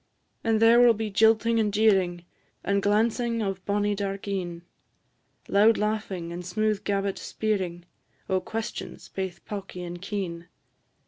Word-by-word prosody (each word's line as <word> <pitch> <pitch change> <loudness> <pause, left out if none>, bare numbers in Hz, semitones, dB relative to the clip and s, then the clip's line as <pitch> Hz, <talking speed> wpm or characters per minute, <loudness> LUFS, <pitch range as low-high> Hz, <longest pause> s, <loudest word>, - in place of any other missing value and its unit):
And 225 -1 +2
there 230 +1 +6
will 240 -1 +6
be 215 0 -3
jilting 225 +2 +4
and 210 -2 +1
jeering, 190 -5 +2 0.4
And 200 0 +1
glancing 230 +3 +1
of 195 -2 -3
bonnie 205 0 +1
dark 200 0 -4
een; 175 -4 -3 0.8
Loud 215 +3 +5
laughing 205 -5 -2
and 175 +1 -6
smooth 215 +3 -1
gabbit 200 -1 -1
speering 185 -5 -2 0.4
O' 190 -1 +1
questions, 225 +2 -6
baith 190 -2 -5
pawky 195 -3 -6
and 175 0 -7
keen. 185 -4 -4
200 Hz, 135 wpm, -26 LUFS, 185-220 Hz, 0.8 s, there